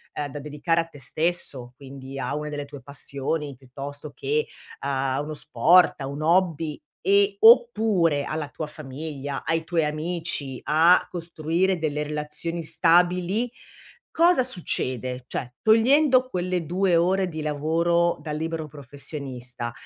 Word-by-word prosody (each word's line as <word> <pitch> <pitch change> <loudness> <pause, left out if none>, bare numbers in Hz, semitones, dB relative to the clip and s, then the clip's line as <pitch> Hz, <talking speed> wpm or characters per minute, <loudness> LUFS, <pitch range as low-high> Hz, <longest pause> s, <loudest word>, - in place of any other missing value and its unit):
uhm, 145 - -2
da 145 +1 -7
dedicare 150 +3 0
a - - -6
te 155 -4 -15
stesso 155 -7 -1
quindi, 135 0 -10
a - - -2
una 150 0 -4
delle 145 -1 -5
tue 140 -1 -11
passioni, 140 +1 -4
piuttosto 140 +3 -7
che 145 +2 -1 0.3
a 135 -1 -1
uno 150 +1 -5
sport, 155 +4 +4
a 135 - -3
un 140 +2 -6
hobby 165 -3 +1 0.2
e 400 +1 +3
oppure 220 - +5
alla 155 0 -3
tua 155 - -5
famiglia, 145 -1 -6
ai 165 0 0
tuoi 165 -1 0
amici, 155 -3 -2
a 165 +4 +5
costruire 170 +2 -1
delle 150 -2 -2
relazioni 150 +3 -4
stabili, 180 +7 +2 0.6
cosa 340 -3 +4
succede? 130 - -1
Cioè 125 -1 -4
togliendo 255 +4 +4
quelle 180 -4 -2
2 180 +2 +1
ore 185 +3 +2
di 160 -3 -6
lavoro 165 +3 +1
dal 150 -1 -4
libero 160 0 -3
professionista, 135 -4 -5
155 Hz, 135 wpm, -24 LUFS, 145-175 Hz, 0.6 s, oppure